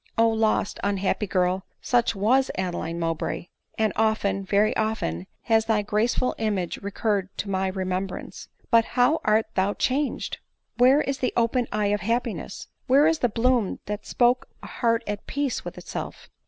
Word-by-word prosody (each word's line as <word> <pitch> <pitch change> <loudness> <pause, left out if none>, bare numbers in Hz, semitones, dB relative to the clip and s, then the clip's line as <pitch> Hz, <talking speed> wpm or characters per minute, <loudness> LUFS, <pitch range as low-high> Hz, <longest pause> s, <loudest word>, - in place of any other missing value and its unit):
Q 225 0 +4
lost, 220 -2 +1
unhappy 200 +1 0
girl! 185 0 +1 0.2
such 240 -2 +1
was 250 +7 +3
Adeline 175 -3 -3
Mowbray; 165 +1 -2 0.3
and 220 -2 +1
often, 210 -3 +1
very 205 +2 +2
often, 215 - -1 0.2
has 225 -1 +3
thy 220 -2 +1
graceful 225 +5 +1
image 205 -5 -1
recurred 200 -1 -1
to 200 - -3
my 190 0 0
remembrance; 185 0 -4 0.2
but, 230 -1 +6
how 250 +6 +4
art 215 +1 +3
thou 195 +2 +1
changed! 275 +2 -1 0.4
Where 260 +4 +6
is 275 -2 -2
the 250 - 0
open 235 +1 +2
eye 205 -1 +1
of 210 - -1
happiness? 230 +1 -2 0.2
where 275 +3 +5
is 320 0 +3
the 245 - +2
bloom 235 -1 +1
that 210 0 -5
spoke 250 +2 +2 0.2
a - - -7
heart 230 -1 0
at 205 -1 -5
peace 285 -2 -2
with - - -7
itself? - - -7
215 Hz, 160 wpm, -25 LUFS, 195-240 Hz, 0.4 s, but